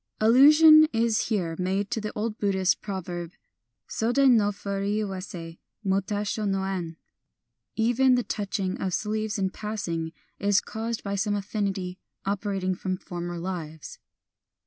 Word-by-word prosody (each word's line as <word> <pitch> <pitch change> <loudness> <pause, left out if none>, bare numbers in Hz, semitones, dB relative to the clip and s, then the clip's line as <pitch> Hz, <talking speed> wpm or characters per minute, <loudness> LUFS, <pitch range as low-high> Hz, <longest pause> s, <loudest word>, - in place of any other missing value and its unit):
Allusion 305 +7 +8
is 225 -1 +1
here 180 -7 -1
made 190 +2 -1
to 225 - -1
the 215 - -4
old 215 +1 -3
Buddhist 190 -2 +1
proverb: 175 -4 -5 0.5
Sodi 255 +4 +3
no 215 -4 +4
furi 200 0 -2
awasi 185 -4 -6 0.2
mo 195 -1 +2
tasho 205 +1 -2
no 195 0 0
en, 175 -4 -4 0.2
— - - -56
" - - -57
Even 245 +3 +3
the 245 - +1
touching 195 -3 -3
of 185 -2 0
sleeves 215 0 -2
in 190 -1 0
passing 185 -7 -4 0.3
is 200 0 +3
caused 225 +1 -5
by 200 - -3
some 205 +1 0
affinity 195 -3 -3 0.3
operating 195 -1 -1
from 185 0 -3
former 175 -1 -6
lives." 165 -3 -6
200 Hz, 145 wpm, -26 LUFS, 185-220 Hz, 0.5 s, Allusion